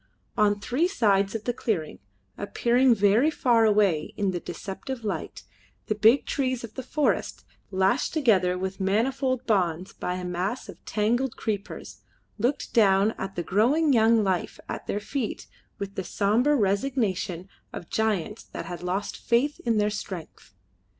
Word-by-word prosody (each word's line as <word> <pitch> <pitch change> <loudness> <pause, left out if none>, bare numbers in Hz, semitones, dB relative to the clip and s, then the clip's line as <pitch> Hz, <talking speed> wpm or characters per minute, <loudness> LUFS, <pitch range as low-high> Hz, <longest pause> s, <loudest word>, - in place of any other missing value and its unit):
On 205 -1 +3
three 255 +11 +1
sides 200 - +2
of 220 - -3
the 245 - -1
clearing, 190 -10 -2 0.4
appearing 240 +4 +2
very 210 +8 +4
far 240 -7 +3
away 205 -8 +2
in 200 -2 +1
the 175 - -3
deceptive 200 +9 -6
light, 210 - -4 0.4
the - - 0
big 220 +6 +4
trees 255 -3 -1
of 225 -2 -8
the 260 - -5
forest, 300 +3 -1 0.2
lashed 190 +6 +1
together 195 - +2
with 190 +1 -4
manifold 255 +6 0
bonds 185 -5 0
by 180 - -3
a 180 0 -5
mass 180 +7 -3
of - - -12
tangled 235 +4 0
creepers, 205 -2 -5 0.4
looked 245 +6 -1
down 200 -1 +4
at 195 0 -5
the 175 - -2
growing 270 - +3
young 225 -1 +4
life 185 -3 -1
at - - -6
their 205 - -1
feet 235 +2 -4 0.3
with 200 -1 -5
the 190 - -3
sombre 225 +11 +2
resignation 200 -5 0 0.2
of 170 - -9
giants 215 -1 -1
that - - -8
had 175 -2 -6
lost 180 +3 -2
faith 260 +5 +1
in 230 -2 +3
their 210 0 +2
strength. 180 - -8
210 Hz, 155 wpm, -26 LUFS, 190-245 Hz, 0.4 s, very